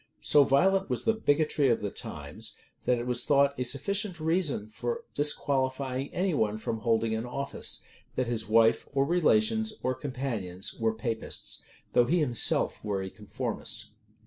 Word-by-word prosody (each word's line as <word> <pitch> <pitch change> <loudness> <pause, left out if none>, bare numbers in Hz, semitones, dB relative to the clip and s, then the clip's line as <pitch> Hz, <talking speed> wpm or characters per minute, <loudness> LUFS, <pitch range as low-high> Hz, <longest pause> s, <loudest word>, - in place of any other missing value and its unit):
So 145 - +6
violent 190 +8 +3
was - - 0
the 225 - +4
bigotry 150 -7 +2
of 115 - +2
the 100 -1 -3
times, - - -5 0.3
that 125 - +3
it 120 - -4
was 125 -1 +1
thought 140 -1 +4
a - - +1
sufficient 185 - -1
reason 160 - 0
for 120 +2 -4
disqualifying 135 -2 0
any 185 0 0
one 110 -6 +1
from 110 +1 -3
holding 115 0 +1
an 110 +2 -2
office, 140 +3 -3 0.3
that 130 - +1
his 115 -2 -2
wife, 115 +1 +4
or 135 0 +2
relations, 215 +7 +2
or 130 - +1
companions 125 -9 -3
were 110 -1 -1
Papists, 110 0 -2 0.3
though 120 - +5
he 170 +8 +2
himself 125 -8 +2
were 100 -2 -2
a 95 - -6
conformist. - - -3
130 Hz, 160 wpm, -29 LUFS, 115-155 Hz, 0.3 s, So